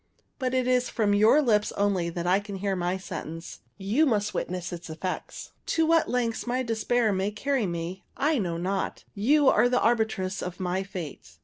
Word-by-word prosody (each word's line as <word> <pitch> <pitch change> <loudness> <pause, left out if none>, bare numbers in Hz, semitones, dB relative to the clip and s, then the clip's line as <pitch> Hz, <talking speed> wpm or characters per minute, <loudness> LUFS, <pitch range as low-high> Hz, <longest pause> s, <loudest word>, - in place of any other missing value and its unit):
But 260 -1 -1
it 255 -1 +1
is 250 -1 +2
from 210 -3 +1
your 220 +9 +5
lips 210 -5 +2
only 195 -4 +1
that 170 0 -4
I 185 +2 +4
can 205 -1 -7
hear 195 0 -1
my 180 +1 -1
sentence. 165 -3 -7 0.2
You 215 +11 +2
must 210 -4 +1
witness 180 0 -3
its 170 -1 -7
effects. 165 +4 -5 0.3
To 325 - +4
what 330 0 +3
lengths 240 -1 -1
my 255 +1 0
despair 225 -1 +1
may 190 +1 0
carry 245 +1 -1
me 170 +1 -4
I 295 0 +2
know 175 -5 -2
not. 190 +3 -2
You 280 +8 +3
are 240 +1 +5
the 250 0 +2
arbitress 220 -5 0
of 180 +1 -5
my 185 0 -1
fate. 150 - -8
205 Hz, 190 wpm, -27 LUFS, 180-245 Hz, 0.3 s, your